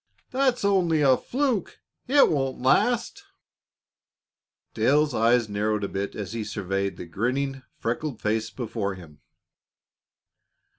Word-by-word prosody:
"That 260 Hz, 0 st, +3 dB
was 240 Hz, -, -4 dB
only 175 Hz, -6 st, +3 dB
a 135 Hz, -2 st, +6 dB
fluke; 250 Hz, -, -1 dB, 0.3 s
it 280 Hz, +2 st, +6 dB
won't 135 Hz, -3 st, -1 dB
last." 240 Hz, -, +1 dB, 1.5 s
Dale's 150 Hz, 0 st, +2 dB
eyes 115 Hz, 0 st, +3 dB
narrowed 105 Hz, 0 st, -1 dB
a -, -, 0 dB
bit 100 Hz, +1 st, -4 dB
as 105 Hz, -1 st, -5 dB
he 115 Hz, -1 st, -3 dB
surveyed 100 Hz, -1 st, -3 dB
the -, -, -7 dB
grinning, 130 Hz, -, -2 dB, 0.2 s
freckled 120 Hz, +2 st, -3 dB
face 110 Hz, +1 st, -1 dB
before 110 Hz, -5 st, -4 dB
him. 80 Hz, -5 st, -14 dB
120 Hz, 120 wpm, -25 LUFS, 105-155 Hz, 1.5 s, a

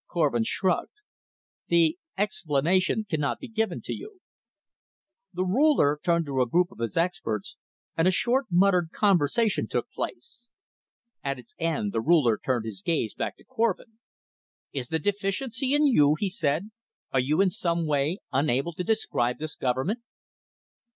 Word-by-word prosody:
Korvin 145 Hz, -9 st, +1 dB
shrugged. 185 Hz, -, -1 dB, 0.7 s
"The 170 Hz, 0 st, +3 dB, 0.2 s
explanation 185 Hz, +1 st, +1 dB
cannot 150 Hz, -5 st, -1 dB
be 270 Hz, -, -9 dB
given 220 Hz, -5 st, -2 dB
to -, -, -4 dB
you." 410 Hz, -1 st, -9 dB, 1.1 s
The 185 Hz, -, -1 dB
Ruler 190 Hz, -, +3 dB
turned 170 Hz, -1 st, +1 dB
to 135 Hz, -3 st, 0 dB
a 125 Hz, -, +2 dB
group 180 Hz, +6 st, +2 dB
of -, -, -16 dB
his 115 Hz, +4 st, -3 dB
experts 160 Hz, -, -1 dB, 0.4 s
and 165 Hz, +2 st, +2 dB
a -, -, +5 dB
short 245 Hz, +7 st, +1 dB
muttered 180 Hz, -1 st, +3 dB
conversation 200 Hz, +2 st, +2 dB
took -, -, -3 dB
place. 240 Hz, -, -7 dB, 0.8 s
At 140 Hz, -1 st, -2 dB
its 120 Hz, -2 st, -14 dB
end 155 Hz, -11 st, -1 dB
the 115 Hz, -, 0 dB
Ruler 140 Hz, -6 st, +3 dB
turned 120 Hz, -4 st, 0 dB
his 100 Hz, -4 st, -6 dB
gaze 130 Hz, -6 st, -1 dB
back -, -, -4 dB
to -, -, -20 dB
Korvin. 225 Hz, 0 st, -2 dB, 0.7 s
"Is 130 Hz, -3 st, -3 dB
the 160 Hz, -, 0 dB
deficiency 205 Hz, -, -1 dB
in 300 Hz, +1 st, +4 dB
you?" 150 Hz, -, +5 dB
he 200 Hz, -, -1 dB
said. 180 Hz, 0 st, -1 dB, 0.4 s
"Are 135 Hz, -, +2 dB
you 145 Hz, +6 st, +1 dB
in 195 Hz, -1 st, +4 dB
some 170 Hz, -2 st, 0 dB
way 150 Hz, +3 st, +1 dB
unable 140 Hz, +3 st, +1 dB
to 180 Hz, -, -4 dB
describe 150 Hz, -, 0 dB
this 155 Hz, -1 st, -5 dB
government?" 130 Hz, -, -1 dB
170 Hz, 150 wpm, -27 LUFS, 140-205 Hz, 1.1 s, a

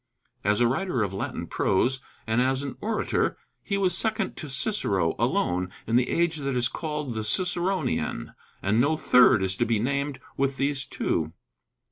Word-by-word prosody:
As 105 Hz, +2 st, +2 dB
a 120 Hz, -, +4 dB
writer 130 Hz, -, 0 dB
of 100 Hz, -2 st, -3 dB
Latin 95 Hz, -, -4 dB
prose, 130 Hz, +7 st, +1 dB, 0.2 s
and 115 Hz, +2 st, +1 dB
as 130 Hz, +2 st, +1 dB
an 140 Hz, -, -5 dB
orator, 215 Hz, 0 st, 0 dB, 0.2 s
he 200 Hz, -, -2 dB
was 185 Hz, -3 st, +2 dB
second 220 Hz, 0 st, 0 dB
to 155 Hz, -, -6 dB
Cicero 100 Hz, -, +1 dB
alone 90 Hz, +1 st, +1 dB, 0.2 s
in 115 Hz, -, 0 dB
the 125 Hz, 0 st, +3 dB
age 170 Hz, -1 st, +1 dB
that 140 Hz, -2 st, -2 dB
is 125 Hz, -1 st, +2 dB
called 150 Hz, -5 st, -4 dB
the 110 Hz, -1 st, -3 dB
Ciceronian; 180 Hz, -, 0 dB, 0.3 s
and 105 Hz, +4 st, +3 dB
no 155 Hz, +4 st, +2 dB
third 125 Hz, -8 st, +5 dB
is 95 Hz, 0 st, +1 dB
to -, -, +2 dB
be 115 Hz, -1 st, +2 dB
named 140 Hz, +4 st, -1 dB, 0.2 s
with 135 Hz, 0 st, 0 dB
these 140 Hz, -1 st, 0 dB
two. 80 Hz, -1 st, -1 dB
135 Hz, 170 wpm, -26 LUFS, 110-160 Hz, 0.3 s, third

